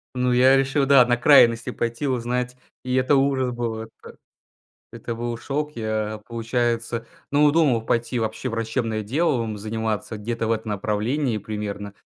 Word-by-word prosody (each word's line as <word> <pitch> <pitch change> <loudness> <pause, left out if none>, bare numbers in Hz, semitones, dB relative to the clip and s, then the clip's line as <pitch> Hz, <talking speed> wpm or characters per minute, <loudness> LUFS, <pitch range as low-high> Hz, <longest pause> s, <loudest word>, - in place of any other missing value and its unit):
Ну 125 0 +1
я 130 +2 +5
решил 135 +1 +1
да 135 -3 +6
на 120 0 +2
крайности 120 -3 +5
пойти, 120 +4 -3
узнать 125 0 -2 0.3
и 130 0 -2
это 130 +2 +3
ужас 135 -2 +1
был! 115 -2 -3
Это, 115 - -14 0.7
это 115 - -6
был 120 0 -4
шок! 150 +4 -3
Я, 110 -1 -3
получается, 115 0 -2 0.3
ну 145 +1 +5
думал 135 -9 +2
пойти 120 +1 0
вообще 110 +3 -3
врачебное 115 -1 -2
делом 120 -3 0
заниматься 110 0 -3
где-то 115 +2 -3
в 115 - +1
этом 110 -1 -2
направлении 110 +5 -1
примерно. 105 -1 -5
120 Hz, 150 wpm, -23 LUFS, 110-130 Hz, 0.7 s, да